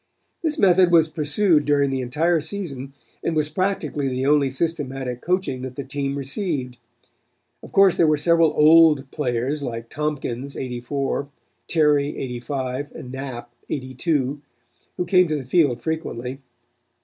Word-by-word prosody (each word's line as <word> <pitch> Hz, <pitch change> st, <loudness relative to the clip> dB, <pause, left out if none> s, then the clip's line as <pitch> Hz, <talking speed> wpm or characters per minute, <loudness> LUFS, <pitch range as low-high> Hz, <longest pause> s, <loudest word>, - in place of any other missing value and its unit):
"This 320 Hz, -2 st, -1 dB
method 185 Hz, -5 st, +5 dB
was 165 Hz, -2 st, +5 dB
pursued 155 Hz, +2 st, +2 dB
during 140 Hz, -2 st, +2 dB
the 135 Hz, -1 st, -1 dB
entire 155 Hz, +7 st, +1 dB
season 145 Hz, -6 st, -6 dB, 0.3 s
and 165 Hz, -, -1 dB
was 155 Hz, -1 st, +1 dB
practically 155 Hz, -5 st, -1 dB
the 130 Hz, 0 st, -2 dB
only 145 Hz, -1 st, +3 dB
systematic 135 Hz, -4 st, -3 dB
coaching 180 Hz, -8 st, -1 dB
that 130 Hz, -1 st, -6 dB
the 140 Hz, -, -4 dB
team 140 Hz, +1 st, -3 dB
received. 140 Hz, -, -3 dB, 0.8 s
Of -, -, -12 dB
course 195 Hz, -2 st, +5 dB
there 165 Hz, -, +4 dB
were 155 Hz, -1 st, +3 dB
several 165 Hz, +1 st, +3 dB
old 150 Hz, -3 st, +6 dB
players 135 Hz, +1 st, -1 dB
like 115 Hz, -3 st, -5 dB
Tompkins 140 Hz, -3 st, -3 dB
'84, 135 Hz, +3 st, -3 dB, 0.4 s
Terry 150 Hz, -3 st, +2 dB
'85 130 Hz, +2 st, -4 dB
and 125 Hz, -, -8 dB
Knapp 130 Hz, -3 st, -6 dB, 0.2 s
'82, 135 Hz, +1 st, -2 dB, 0.6 s
who 180 Hz, -, -1 dB
came 180 Hz, 0 st, +4 dB
to 155 Hz, -, -1 dB
the 140 Hz, -3 st, -4 dB
field 140 Hz, -3 st, +2 dB
frequently. 135 Hz, -5 st, -4 dB
145 Hz, 140 wpm, -23 LUFS, 130-160 Hz, 0.8 s, old